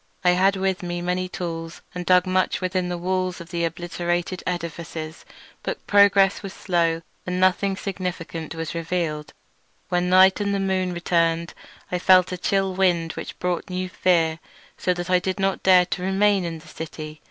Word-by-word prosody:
I 180 - +5
had 190 +2 +3
with 190 0 -1
me 175 -1 -3
many 180 +1 -2
tools, 165 -2 -5
and 180 -1 -6
dug 180 0 +5
much 185 0 +1
within 185 -1 -1
the 175 - -2
walls 185 +1 -1
of 170 +1 -11
the 170 -1 -1
obliterated 175 +1 -2
edifices; 165 -2 -5 0.4
but - - -5
progress 200 -1 +5
was 195 -1 -7
slow, 170 -3 0 0.2
and 180 0 -1
nothing 185 +1 +2
significant 175 -5 -5
was 165 -1 -4
revealed. 165 -3 -2 0.6
When 180 0 +1
night 185 +2 +6
and 200 0 0
the - - 0
moon 190 -1 0
returned 170 -1 0 0.4
I 180 - 0
felt 185 0 +5
a 180 - -3
chill 195 +1 +1
wind 175 -3 +1
which - - -7
brought 180 -1 -2
new 185 0 -3
fear, 165 -3 +2 0.4
so 180 - 0
that 175 +1 -4
I 180 - +5
did 185 +1 -3
not 195 0 0
dare 185 -1 +6
to 180 +1 -4
remain 195 0 +2
in 165 -1 -4
the 155 - -15
city. 155 -1 -8
180 Hz, 175 wpm, -23 LUFS, 170-185 Hz, 0.6 s, night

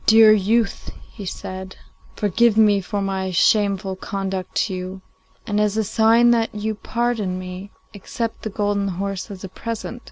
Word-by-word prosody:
'Dear 220 0 +8
youth,' 215 +2 +1 0.2
he 205 -4 -8
said, 185 +1 -6 0.4
'forgive 215 +2 +2
me 210 -2 +5
for 200 +2 -3
my 190 -1 -2
shameful 195 +1 +2
conduct 190 -1 -4
to 195 - 0
you, 185 +1 -6 0.4
and, 210 -2 -1
as 210 0 +1
a 220 - +2
sign 225 +3 +4
that 225 -2 +1
you 215 +1 -2
pardon 220 -3 -2
me, 185 +2 -7 0.2
accept 225 +3 -5
the 220 - -4
golden 205 -1 -1
horse 195 +2 -4
as 195 -2 -9
a - - -4
present. 230 +4 -6
205 Hz, 160 wpm, -22 LUFS, 190-220 Hz, 0.4 s, Dear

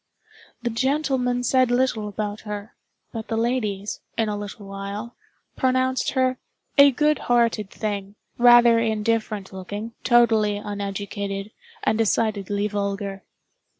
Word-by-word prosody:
The 240 - -1
gentlemen 260 -1 0
said 255 0 +3
little 245 -4 +1
about 210 0 -4
her; 210 0 -7 0.4
but 225 -1 -5
the 225 - -2
ladies, 215 -4 -1 0.2
in 225 -1 +1
a 210 - -1
little 205 0 -7
while, 200 +4 -6 0.4
pronounced 260 0 +1
her 255 -1 +1 0.4
"a 280 0 +8
good 300 +3 +2
hearted 230 -4 +2
thing, 205 -2 -4 0.2
rather 240 -1 +7
indifferent 220 -3 -1
looking, 205 +4 -6
totally 225 -4 +4
uneducated, 200 0 -4 0.3
and 220 - +1
decidedly 205 -2 +1
vulgar." 200 -1 -3
220 Hz, 115 wpm, -24 LUFS, 205-240 Hz, 0.4 s, a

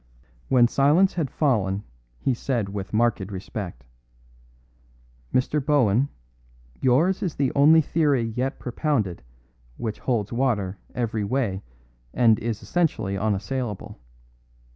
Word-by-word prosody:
When 125 -2 +5
silence 150 +10 +3
had 160 -6 -1
fallen 105 -9 0 0.3
he 130 - 0
said 120 -4 -2
with 100 -1 -5
marked 115 +1 +2
respect: 95 - -6 1.5
"Mr. 140 +3 +1
Bohun, 135 -3 +3 0.7
yours 155 +10 +3
is 175 -5 -2
the 135 -2 +1
only 155 +3 +6
theory 140 -8 +1
yet 130 +2 -1
propounded 125 - -1 0.6
which 110 -2 -4
holds 115 -4 -1
water 110 -7 0 0.2
every 115 -3 -1
way 100 -3 -1 0.5
and 115 -3 +4
is 115 -1 -3
essentially 110 - 0
unassailable. 105 - -3
120 Hz, 110 wpm, -24 LUFS, 105-140 Hz, 1.5 s, only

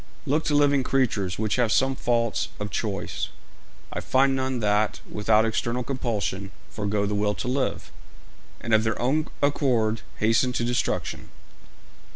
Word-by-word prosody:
'Looking 150 +4 0
to 150 - +2
living 145 -1 +4
creatures, 115 -9 0
which 110 +1 0
have 120 -3 +2
some 135 +2 +3
faults 115 -2 0
of 105 0 -4
choice, 100 -3 -3 0.6
I - - -2
find 135 +1 +3
none 130 -1 -1
that, 105 0 +1
without 105 +1 +2
external 115 +2 -1
compulsion, 110 -6 -2 0.2
forego 105 -1 -1
the 105 - -1
will 105 0 +1
to - - -4
live, 130 +1 -1 0.7
and 115 - -2
of 110 0 +5
their 110 0 -1
own 145 +6 +1 0.2
accord 120 -6 +2 0.2
hasten 115 +3 +2
to 120 - -1
destruction. 120 +1 -2
115 Hz, 150 wpm, -25 LUFS, 105-130 Hz, 0.7 s, of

